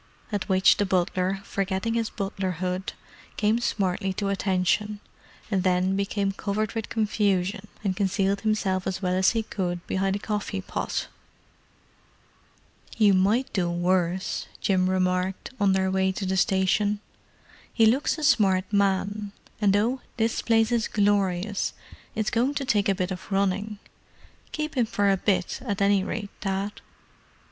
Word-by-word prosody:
At 205 0 -2
which 190 0 +5
the 205 - +1
butler, 185 +1 0
forgetting 195 +3 -2
his 230 -1 0
butlerhood, 185 -2 -3 0.4
came 215 +2 +2
smartly 190 -4 -1
to 200 +1 -2
attention—and 200 +1 -2
then 185 +1 +2
became 200 0 0
covered 205 +1 -2
with 225 -2 -4
confusion 205 -2 0 0.2
and 190 -3 0
concealed 195 0 0
himself 200 -4 0
as 190 +1 -3
well 180 0 +1
as 185 0 +3
he 225 -1 0
could 175 -4 -3
behind 195 0 0
a - - 0
coffee 205 -1 -3
pot. - - -3 1.9
"You 210 -3 +5
might 215 +8 +2
do 180 -4 +1
much 175 - -3
worse," 180 +1 0
Jim 185 -2 +2
remarked, 185 +2 0
on 200 -2 +4
their 190 0 +1
way 190 0 +2
to 195 - -4
the 190 0 0
station. 195 +2 +2 0.7
"He 225 - +4
looks 260 +8 +2
a 310 - -5
smart 200 -10 +4
man—and 200 +1 0
though 230 +6 +1 0.2
this 225 0 0
place 225 0 +3
is 235 -2 +1
glorious, 200 -1 +1 0.4
it's 215 -1 -1
going 255 +5 +1
to 280 - -2
take 210 -6 +2
a 195 - +2
bit 185 0 -2
of 185 +2 -7
running. 200 +2 0 0.7
Keep 305 0 -3
him 240 -3 +3
for 205 -3 +2
a - - +4
bit, 185 -2 0
at 205 -6 -2
any 200 -1 +3
rate, 205 0 -4
Dad." 195 +1 -3
195 Hz, 150 wpm, -26 LUFS, 190-210 Hz, 1.9 s, which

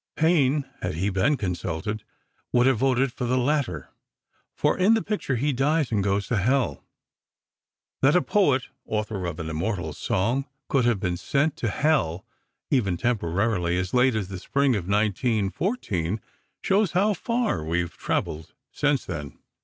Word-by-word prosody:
Payne, 150 -4 +3 0.2
had - - -2
he 95 +5 0
been 115 +10 +2
consulted, 95 +1 -3 0.5
would 120 0 +4
have 130 -4 +3
voted 130 0 +2
for 125 - -3
the 125 +2 +1
latter, 125 - 0 0.7
for - - +2
in 200 +5 +4
the 225 - 0
picture, 205 -10 -2
he 140 +4 0
dies 145 +2 +1
and 105 -3 +1
goes 100 0 0
to 120 - -1
Hell. 115 - +1 1.2
That 135 +4 +5
a 180 - +4
poet, 145 -11 +3 0.2
author 105 -4 -3
of 80 -3 -5
an 80 - -4
immortal 85 +4 -2
song, 120 +9 0 0.2
could 130 -4 +2
have 120 -4 +2
been 90 -2 -1
sent 140 - 0
to 115 - -1
Hell, 120 - +1 0.5
even 100 -10 +2
temporarily, 95 -4 0
as 90 0 -2
late 125 -1 +4
as 100 -4 -2
the 95 -2 -6
Spring 140 +4 +1
of 95 -4 -3
1914, 105 - 0 0.4
shows 195 -3 +2
how 200 +4 +3
far 230 - -1
we 85 +3 0
have 85 0 -6
traveled 80 +1 -3 0.2
since 145 -2 +1
then. 75 -1 -6
115 Hz, 160 wpm, -25 LUFS, 95-140 Hz, 1.2 s, That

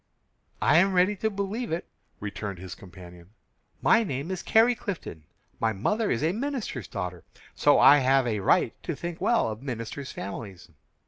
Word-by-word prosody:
"I 150 - +5
am 190 +3 +4
ready 185 +3 +3
to 220 - 0
believe 200 +3 -3
it," 165 +2 -3 0.3
returned 100 -1 -5
his 90 0 -8
companion. 90 +1 -14 0.5
"My 230 0 +5
name 145 - -4
is 185 - -3
Carrie 230 +2 +4
Clifton; 185 - -6 0.3
my 110 -1 +1
mother 210 - 0
is 120 - 0
a 160 - +2
minister's 225 - -4
daughter, 90 -3 -5 0.3
so - - +4
I 145 - +8
have 135 0 +3
a 110 -3 -1
right 95 - +2
to - - -4
think 175 0 -6
well 230 - +2
of 110 - -8
ministers' 130 +1 -5
families." 100 -1 -8
135 Hz, 170 wpm, -27 LUFS, -, 0.5 s, I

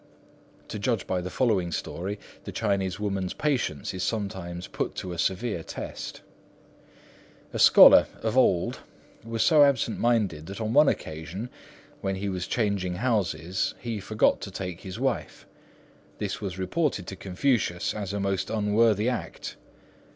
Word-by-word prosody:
To - - -4
judge - - 0
by 90 -1 -1
the 90 - -5
following 95 -6 +1
story, 95 +5 -4 0.3
the - - -5
Chinese 100 -3 -1
woman's 95 -3 -2
patience 125 - -1
is 95 - -4
sometimes 95 -5 -3
put - - -3
to 90 - -5
a 85 - -7
severe 95 +1 0
test. - - -7 1.3
A - - -3
scholar - - +9 0.2
of 110 +1 0
old 95 -9 +3 0.4
was 115 -1 -1
so 155 -2 +6
absent 135 -5 +2
minded, 105 -10 +1
that 100 - -7
on 110 0 -2
one 150 +2 +6
occasion, 85 +9 -5 0.5
when 95 0 -1
he 100 +1 -3
was 95 -1 -3
changing 100 -6 0
houses, 95 -5 0
he 115 -3 -4
forgot 110 +3 +2
to - - -5
take 90 -2 -6
his 95 -1 -7
wife. - - -2 0.7
This - - -3
was 95 -3 -4
reported 105 - -1
to 95 - -6
Confucius 95 -1 0
as 100 -3 -4
a 100 - -2
most 100 -1 -1
unworthy 110 0 +2
act. 125 -2 -4
100 Hz, 150 wpm, -27 LUFS, 90-115 Hz, 1.3 s, scholar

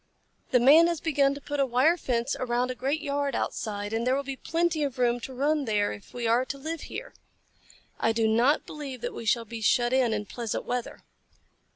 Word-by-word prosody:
The 250 - +4
Man 300 +7 +7
has 340 -2 -1
begun 280 -3 +2
to 285 - -9
put 290 +1 -4
a 275 - +4
wire 260 +7 +3
fence 250 -4 -1
around 250 0 0
a - - -3
great 275 +5 -2
yard 285 -3 -1
outside, 205 -1 -3
and 230 +2 -1
there 255 - +3
will 280 - -1
be 275 0 -5
plenty 330 +2 -1
of 275 -3 -2
room 245 -1 +2
to 255 - -7
run 285 +3 0
there 210 -3 +1
if 105 - -12
we 245 -1 -4
are 235 +3 +3
to 275 +2 -6
live 315 +3 -5
here. - - -7 0.9
I 225 - +2
do 225 0 +1
not 240 +7 +3
believe 275 -5 -7
that - - -4
we 230 - -7
shall 230 +1 +2
be 225 0 -7
shut 240 +3 +2
in, 255 -3 +3
in 210 -1 -2
pleasant 230 +1 -4
weather." 245 -1 -4
255 Hz, 220 wpm, -27 LUFS, 235-285 Hz, 0.9 s, Man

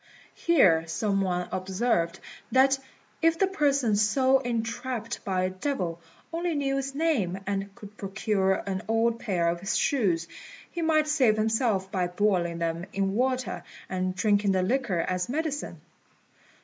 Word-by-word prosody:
Here 180 - +4
some 195 +4 0
one 180 -2 -1
observed 185 -2 0 0.3
that 270 +1 +4 0.4
if 330 0 +3
the 390 - +4
person 280 - +1
so 260 +6 +3
entrapped 235 -1 -3
by 185 -2 0
a 185 - 0
devil 185 - -3 0.3
only 340 0 -1
knew 275 -1 0
its 275 0 -5
name, 270 - +1
and 200 0 -2
could 210 -3 -12
procure 195 -1 0
an 190 -2 -2
old 225 +1 +1
pair 180 -7 0
of 170 +1 -1
its 195 +1 -1
shoes, 180 - +1 0.4
he 340 - -4
might 310 -2 +3
save 260 -8 +3
himself 215 -3 +1
by 180 -2 0
boiling 180 -2 +1
them 170 +1 -2
in 195 0 0
water 255 +2 -1 0.3
and 185 0 -2
drinking 205 0 +2
the 185 -1 +2
liquor 220 -5 0
as 180 +1 -1
medicine. 300 +1 -3
210 Hz, 150 wpm, -27 LUFS, 185-265 Hz, 0.4 s, Here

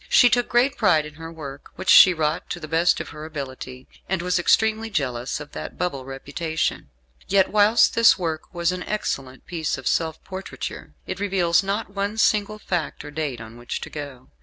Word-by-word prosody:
She 245 - +6
took 245 -1 +2
great 250 +3 +2
pride 175 -8 +3
in 150 - -9
her 165 +2 -9
work, 140 -4 -9
which 190 - +1
she 185 - +10
wrought 155 -1 -1
to 175 - -4
the 155 - -7
best 165 +3 +2
of - - -6
her 150 - -9
ability, 130 -4 -7 0.2
and 185 -2 -1
was 180 0 +1
extremely 220 +4 +2
jealous 130 - -2
of 145 -1 -10
that - - -7
bubble 140 -7 -2
reputation. 140 - -3 0.4
Yet 195 -1 +3
whilst 210 +2 +5
this 230 -7 +6
work 165 -4 -4
was 175 -1 0
an 185 0 -4
excellent 135 -11 -4
piece 165 -5 -2
of 135 - -10
self 160 -1 0
portraiture, 190 0 -7
it 185 - -5
reveals 185 -4 +2
not 200 +1 -3
one 200 +2 -2
single 215 -1 +2
fact 175 -7 -3
or 145 - -8
date 145 -5 -3
on 110 +1 -10
which 120 0 -5
to - - -7
go. 140 -4 -8
165 Hz, 195 wpm, -23 LUFS, 145-195 Hz, 0.4 s, she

